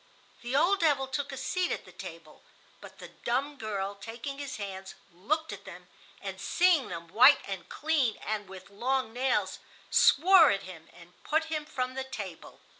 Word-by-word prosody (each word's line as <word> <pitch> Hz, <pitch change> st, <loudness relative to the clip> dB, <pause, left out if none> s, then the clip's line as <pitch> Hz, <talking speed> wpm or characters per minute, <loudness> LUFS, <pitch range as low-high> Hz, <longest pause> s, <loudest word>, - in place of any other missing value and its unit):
The 240 Hz, +2 st, -3 dB
old 365 Hz, +7 st, +4 dB
devil 290 Hz, -6 st, +3 dB
took 280 Hz, +2 st, -3 dB
a 270 Hz, -, -6 dB
seat 360 Hz, +6 st, -1 dB
at -, -, -3 dB
the -, -, -14 dB
table, -, -, -11 dB, 0.4 s
but -, -, -13 dB
the -, -, -10 dB
dumb 270 Hz, +5 st, -2 dB
girl, 205 Hz, -4 st, -3 dB
taking 230 Hz, +7 st, -7 dB
his 285 Hz, -2 st, -5 dB
hands, 190 Hz, -2 st, -7 dB, 0.2 s
looked 310 Hz, -, -2 dB
at -, -, -10 dB
them, -, -, -11 dB, 0.4 s
and -, -, -6 dB
seeing 350 Hz, -6 st, +3 dB
them 170 Hz, -1 st, -7 dB
white 255 Hz, -, +7 dB
and 195 Hz, -2 st, -6 dB
clean, 295 Hz, -7 st, 0 dB
and 210 Hz, -2 st, -3 dB
with 190 Hz, 0 st, -11 dB
long 250 Hz, +2 st, -1 dB
nails, 255 Hz, +2 st, 0 dB, 0.3 s
swore 340 Hz, +1 st, +7 dB
at 200 Hz, 0 st, 0 dB
him 165 Hz, -3 st, -11 dB
and 175 Hz, 0 st, -18 dB
put 315 Hz, +1 st, +1 dB
him 305 Hz, -1 st, -2 dB
from 255 Hz, -3 st, -3 dB
the 265 Hz, 0 st, -3 dB
table. 205 Hz, -10 st, -8 dB
255 Hz, 180 wpm, -29 LUFS, 200-290 Hz, 0.4 s, white